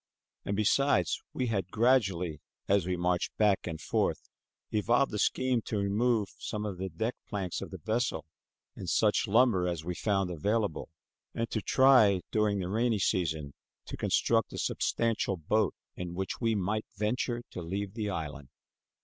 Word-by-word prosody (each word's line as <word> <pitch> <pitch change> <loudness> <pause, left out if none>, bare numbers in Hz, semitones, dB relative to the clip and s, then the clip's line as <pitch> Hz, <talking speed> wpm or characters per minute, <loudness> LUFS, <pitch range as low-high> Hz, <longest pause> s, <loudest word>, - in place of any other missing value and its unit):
And, 100 - -1
beside, 110 -1 +3 0.3
we 130 - -2
had 100 -6 -1
gradually, 95 - +2 0.3
as 100 -3 +2
we 90 - 0
marched 90 0 -1
back 105 -3 +2
and 80 -2 -4
forth, - - -1 0.4
evolved 120 +4 +2
a 105 - -1
scheme 130 +2 +1
to 110 - -2
remove 105 +2 +1
some 105 0 -4
of 95 -4 -5
the 95 0 -3
deck 110 +9 -2 0.2
planks 95 -4 -3
of - - -6
the - - -7
vessel 110 -8 -1 0.5
and - - -6
such - - +2
lumber 110 -4 +4
as 85 -3 -3
we 90 - -2
found 95 -1 0
available, 100 +2 -1 0.5
and 115 0 -2
to 110 - -1
try, 125 -9 +5
during 105 -2 +2
the 90 -2 -2
rainy 115 +2 +1
season, 80 -7 -1 0.3
to - - -6
construct - - +1
a - - -5
substantial 115 -4 0
boat 100 +4 +1 0.2
in 90 -1 -5
which 95 +5 -4
we 115 -2 +2
might 105 +2 -1
venture 120 +3 -1
to 90 - -6
leave 95 +4 -4
the 110 -2 -3
island. 75 -6 -5
100 Hz, 165 wpm, -30 LUFS, 90-115 Hz, 0.5 s, try